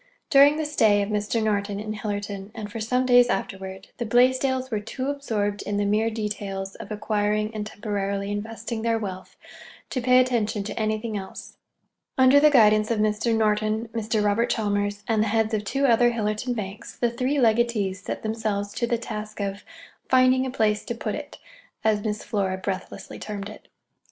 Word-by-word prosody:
During 285 Hz, +1 st, +7 dB
the 315 Hz, -, -1 dB
stay 215 Hz, -9 st, +3 dB
of 200 Hz, -, -4 dB
Mr. 210 Hz, +2 st, 0 dB
Norton 205 Hz, -1 st, -1 dB
in 215 Hz, 0 st, -4 dB
Hillerton, 205 Hz, -2 st, -4 dB
and 210 Hz, -2 st, -6 dB
for 225 Hz, -, -5 dB
some 250 Hz, +4 st, 0 dB
days 245 Hz, -1 st, +6 dB
afterward, 190 Hz, -1 st, -4 dB
the 240 Hz, -, -3 dB
Blaisdells 260 Hz, +2 st, +2 dB
were 215 Hz, -, 0 dB
too 255 Hz, +6 st, -3 dB
absorbed 210 Hz, -8 st, -2 dB
in 205 Hz, -, -3 dB
the 205 Hz, -, +1 dB
mere 215 Hz, +2 st, +2 dB
details 205 Hz, -3 st, -4 dB
of -, -, -10 dB
acquiring 210 Hz, 0 st, 0 dB
and 210 Hz, -1 st, -4 dB
temporarily 200 Hz, -2 st, -3 dB
investing 225 Hz, +2 st, -4 dB
their 230 Hz, 0 st, +1 dB
wealth 190 Hz, -4 st, -7 dB, 0.5 s
to 255 Hz, -, -1 dB
pay 250 Hz, +1 st, +5 dB
attention 225 Hz, -4 st, +1 dB
to 205 Hz, -, -5 dB
anything 215 Hz, 0 st, -1 dB
else. 190 Hz, -1 st, -8 dB, 0.6 s
Under 260 Hz, +2 st, +7 dB
the 300 Hz, +1 st, +6 dB
guidance 215 Hz, -5 st, +5 dB
of 230 Hz, -, +1 dB
Mr. 215 Hz, +2 st, +1 dB
Norton, 215 Hz, +1 st, +1 dB
Mr. 220 Hz, -2 st, -1 dB
Robert 210 Hz, +3 st, +2 dB
Chalmers, 205 Hz, -1 st, -1 dB
and 220 Hz, -2 st, +2 dB
the 220 Hz, -, +1 dB
heads 220 Hz, +1 st, +1 dB
of 210 Hz, -1 st, 0 dB
two 275 Hz, +6 st, 0 dB
other 240 Hz, -1 st, +5 dB
Hillerton 225 Hz, +2 st, -2 dB
banks, 205 Hz, 0 st, -7 dB
the 240 Hz, -1 st, +1 dB
three 255 Hz, +4 st, -1 dB
legatees 220 Hz, -6 st, +2 dB
set -, -, -5 dB
themselves 215 Hz, -2 st, -2 dB
to 235 Hz, -, -1 dB
the 235 Hz, -, +1 dB
task 215 Hz, -2 st, -6 dB
of 200 Hz, 0 st, -3 dB, 0.5 s
"finding 255 Hz, 0 st, +4 dB
a -, -, -3 dB
place 215 Hz, -4 st, +1 dB
to 235 Hz, -, -3 dB
put -, -, -3 dB
it," -, -, -7 dB, 0.5 s
as 210 Hz, -1 st, +2 dB
Miss 210 Hz, -1 st, -3 dB
Flora 190 Hz, -3 st, -1 dB
breathlessly 190 Hz, 0 st, -5 dB
termed 205 Hz, -1 st, -5 dB
it. 215 Hz, -, -13 dB
215 Hz, 180 wpm, -25 LUFS, 205-235 Hz, 0.6 s, During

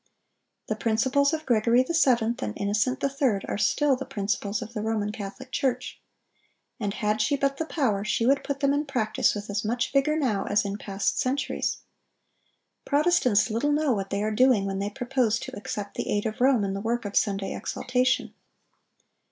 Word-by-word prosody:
The 215 Hz, -, -2 dB
principles 260 Hz, +6 st, +2 dB
of 315 Hz, -1 st, -3 dB
Gregory 235 Hz, +1 st, +3 dB
VII. 245 Hz, -8 st, +3 dB
and 105 Hz, -, -3 dB
Innocent 215 Hz, +6 st, 0 dB
III. 270 Hz, -7 st, +1 dB
are -, -, -2 dB
still 285 Hz, +6 st, +3 dB
the 260 Hz, -, -5 dB
principles 205 Hz, +2 st, -2 dB
of 225 Hz, +1 st, -11 dB
the 215 Hz, -, -3 dB
Roman 215 Hz, -1 st, -1 dB
Catholic 215 Hz, +6 st, -8 dB
Church. 255 Hz, -2 st, -2 dB, 0.8 s
And 205 Hz, -2 st, -2 dB
had 215 Hz, 0 st, 0 dB
she 250 Hz, +7 st, +2 dB
but 275 Hz, 0 st, 0 dB
the 320 Hz, -, -3 dB
power, 225 Hz, -13 st, 0 dB
she 230 Hz, +2 st, 0 dB
would 275 Hz, +2 st, +3 dB
put 280 Hz, 0 st, -4 dB
them 280 Hz, 0 st, +3 dB
in 290 Hz, +1 st, -1 dB
practice 220 Hz, -7 st, +1 dB
with 205 Hz, 0 st, -5 dB
as 205 Hz, +1 st, -2 dB
much 235 Hz, +4 st, -1 dB
vigor 290 Hz, +3 st, +2 dB
now 225 Hz, -10 st, 0 dB
as 205 Hz, 0 st, +1 dB
in 200 Hz, 0 st, -3 dB
past 195 Hz, -1 st, -1 dB
centuries. 270 Hz, +2 st, -1 dB, 1.0 s
Protestants 280 Hz, -8 st, +2 dB
little 235 Hz, +7 st, +1 dB
know 295 Hz, -1 st, +2 dB
what 195 Hz, -2 st, -3 dB
they 200 Hz, +1 st, -1 dB
are 215 Hz, -, 0 dB
doing 250 Hz, -3 st, +4 dB
when 195 Hz, 0 st, -2 dB
they 200 Hz, +1 st, -1 dB
propose 245 Hz, -1 st, 0 dB
to 260 Hz, 0 st, -7 dB
accept 205 Hz, 0 st, -5 dB
the -, -, -4 dB
aid 205 Hz, 0 st, 0 dB
of 220 Hz, +1 st, -3 dB
Rome 255 Hz, -4 st, +4 dB
in 195 Hz, -1 st, -1 dB
the 195 Hz, -, -4 dB
work 235 Hz, +1 st, -1 dB
of 205 Hz, -, -5 dB
Sunday 195 Hz, -1 st, 0 dB
exaltation. 255 Hz, 0 st, 0 dB
230 Hz, 185 wpm, -26 LUFS, 205-270 Hz, 1.0 s, doing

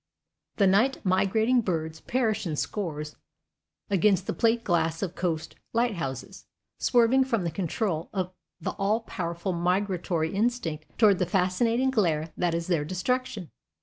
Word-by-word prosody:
The 200 Hz, -, +3 dB
night 210 Hz, +8 st, +4 dB
migrating 220 Hz, +6 st, +3 dB
birds 160 Hz, -5 st, -2 dB
perish 225 Hz, -6 st, 0 dB
in 155 Hz, -, -2 dB
scores 150 Hz, -4 st, -4 dB, 0.7 s
against 195 Hz, -1 st, +3 dB
the -, -, -2 dB
plate 230 Hz, 0 st, +2 dB
glass 165 Hz, -1 st, 0 dB
of 180 Hz, -3 st, -3 dB
coast 165 Hz, -4 st, -2 dB, 0.2 s
lighthouses, 190 Hz, -, -2 dB, 0.3 s
swerving 245 Hz, +2 st, +4 dB
from 230 Hz, -7 st, 0 dB
the 170 Hz, -, -1 dB
control 170 Hz, -1 st, -2 dB
of 185 Hz, -2 st, -3 dB, 0.3 s
the 160 Hz, -, -2 dB
all 210 Hz, +3 st, 0 dB
powerful 175 Hz, -3 st, -3 dB
migratory 175 Hz, -2 st, 0 dB
instinct 195 Hz, -8 st, -1 dB
toward 205 Hz, -5 st, +5 dB
the 180 Hz, -, +1 dB
fascinating 225 Hz, +8 st, +2 dB
glare 165 Hz, -9 st, +1 dB
that 175 Hz, -2 st, 0 dB
is 170 Hz, 0 st, -2 dB
their 165 Hz, -4 st, +1 dB
destruction. 185 Hz, -, -2 dB
185 Hz, 140 wpm, -27 LUFS, 165-225 Hz, 0.7 s, toward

